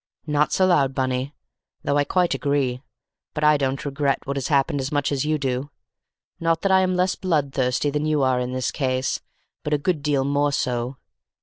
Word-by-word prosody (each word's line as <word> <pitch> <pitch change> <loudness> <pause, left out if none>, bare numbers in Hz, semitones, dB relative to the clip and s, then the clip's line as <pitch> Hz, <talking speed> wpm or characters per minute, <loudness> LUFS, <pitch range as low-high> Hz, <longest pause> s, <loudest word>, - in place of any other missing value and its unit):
"Not 150 -1 +1
so 190 - +3
loud, 140 -7 +3
Bunny, 130 +1 -1 0.5
though 140 - 0
I 145 - +2
quite 180 +3 +1
agree; 135 -3 0 0.5
but 150 - -2
I 150 0 +6
don't 135 -1 -1
regret 140 0 -1
what 140 - -3
has 135 -2 -2
happened 140 0 +1
as 130 - -4
much 145 -1 0
as 140 0 0
you 155 0 +1
do. 135 0 -2 0.7
Not 165 -1 0
that 195 - +2
I 190 - +6
am 185 -1 +1
less 180 +1 +2
bloodthirsty 140 -6 0
than 150 +1 -1
you 150 -2 +2
are 130 -1 +2
in 125 0 -2
this 130 0 -1
case, 130 -1 -1 0.4
but 150 0 +1
a - - +1
good 155 +1 -1
deal 145 -2 +1
more 145 +1 +1
so! 125 -1 -2
140 Hz, 200 wpm, -23 LUFS, 130-150 Hz, 0.7 s, I